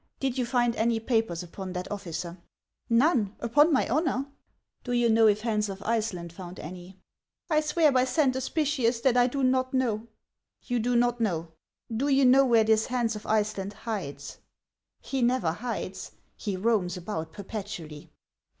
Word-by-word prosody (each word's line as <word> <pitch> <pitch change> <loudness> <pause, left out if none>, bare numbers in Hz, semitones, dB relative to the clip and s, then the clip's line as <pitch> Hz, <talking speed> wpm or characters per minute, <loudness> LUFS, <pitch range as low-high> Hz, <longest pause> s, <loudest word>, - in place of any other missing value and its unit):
Did 265 -2 -1
you 250 -3 -1
find 240 -2 +1
any 230 0 +1
papers 225 -7 0
upon 185 +2 -7
that 180 +2 -5
officer? 175 -3 -5 0.2
" - - -63
" - - -44 0.2
None, 220 - +1
upon 290 +8 +4
my 265 - +2
honor." 275 -1 0 0.3
" - - -51
Do 245 - -3
you 240 -1 +3
know 225 0 +5
if 210 0 +3
Hans 215 -2 0
of 195 +1 -7
Iceland 210 -7 -2
found 180 0 -9
any? 180 +3 -9 0.2
" - - -63
" - - -49
I 305 0 +4
swear 310 0 +3
by 255 -1 +3
Saint 260 +1 +2
Hospitius 260 -3 0
that 260 -3 +3
I 245 0 +5
do 275 +2 -2
not 255 0 +1
know." 230 -4 0 0.3
" - - -61
You 245 -1 0
do 240 +1 +2
riot 245 0 +1
know? 170 -7 -1 0.4
Do 265 +6 0
you 275 -1 +4
know 260 +2 +7
where 230 -2 +5
this 220 0 +2
Hans 240 -3 0
of 210 - -8
Iceland 210 -2 0
hides? 210 -9 -6 0.2
" - - -64
" - - -57
He 270 -1 0
never 240 -8 +2
hides; 210 -1 -5 0.2
he 200 -3 -4
roams 190 -4 +1
about 170 -3 -5
perpetually." 195 -7 -7
225 Hz, 190 wpm, -27 LUFS, 195-255 Hz, 0.4 s, know